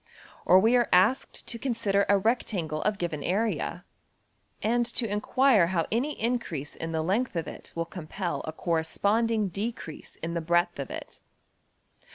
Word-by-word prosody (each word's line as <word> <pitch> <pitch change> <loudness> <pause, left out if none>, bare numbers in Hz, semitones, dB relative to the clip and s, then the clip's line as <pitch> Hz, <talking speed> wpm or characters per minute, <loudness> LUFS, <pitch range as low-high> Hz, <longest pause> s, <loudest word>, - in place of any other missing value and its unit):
Or 185 - +8
we 225 +5 +4
are 240 -1 +3
asked 200 +9 +2
to 230 - -3
consider 215 -6 +1
a 200 - +6
rectangle 190 -8 -1
of 210 -1 0
given 165 -5 -3
area, 210 +8 -1 0.8
and 240 +2 +2
to 235 0 0
enquire 210 0 +3
how 170 -2 0
any 265 +7 -1
increase 215 - -2
in 165 0 -5
the 160 -1 -1
length 205 +7 0
of 165 - -2
it - - -9
will 165 0 -1
compel 175 +1 -4
a 155 - -4
corresponding 200 +7 +1
decrease 200 -3 -6
in 165 +1 -5
the 170 - -1
breadth 175 0 +1
of 140 - -4
it. - - -8
195 Hz, 160 wpm, -28 LUFS, 165-230 Hz, 0.8 s, Or